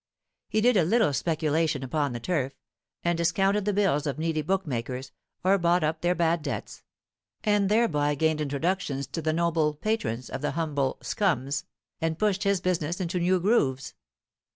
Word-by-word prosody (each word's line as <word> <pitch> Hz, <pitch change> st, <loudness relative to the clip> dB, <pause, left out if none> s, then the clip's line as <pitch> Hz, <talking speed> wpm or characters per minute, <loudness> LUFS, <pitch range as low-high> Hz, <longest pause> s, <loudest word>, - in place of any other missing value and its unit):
He 215 Hz, -, +1 dB
did 245 Hz, -1 st, +4 dB
a 180 Hz, -, +5 dB
little 210 Hz, -2 st, +3 dB
speculation 155 Hz, -2 st, 0 dB
upon 145 Hz, +1 st, -1 dB
the 120 Hz, -, -4 dB
turf, 135 Hz, 0 st, -1 dB, 0.5 s
and 175 Hz, 0 st, +2 dB
discounted 195 Hz, +5 st, +1 dB
the 210 Hz, -, +2 dB
bills 185 Hz, -8 st, +1 dB
of 140 Hz, -, -2 dB
needy 160 Hz, 0 st, -1 dB
bookmakers, 135 Hz, -7 st, -2 dB, 0.3 s
or 195 Hz, +2 st, +4 dB
bought 175 Hz, 0 st, +2 dB
up 155 Hz, +1 st, -1 dB
their 175 Hz, +1 st, +2 dB
bad 170 Hz, -1 st, +1 dB
debts, -, -, -5 dB, 0.6 s
and 205 Hz, -2 st, +2 dB
thereby 150 Hz, -10 st, +2 dB
gained 160 Hz, +1 st, +1 dB
introductions 145 Hz, -1 st, -1 dB
to 165 Hz, -, -5 dB
the 155 Hz, 0 st, 0 dB
noble 160 Hz, -2 st, +1 dB
patrons 145 Hz, -, -2 dB
of -, -, -5 dB
the 145 Hz, -1 st, -1 dB
humble 145 Hz, -4 st, -1 dB
"scums," 140 Hz, -, 0 dB, 0.4 s
and 160 Hz, -1 st, 0 dB
pushed 205 Hz, -1 st, +1 dB
his 200 Hz, -2 st, +2 dB
business 175 Hz, -1 st, -1 dB
into 180 Hz, 0 st, -1 dB
new 180 Hz, +2 st, +2 dB
grooves. 140 Hz, -, +1 dB
165 Hz, 165 wpm, -27 LUFS, 145-185 Hz, 0.6 s, a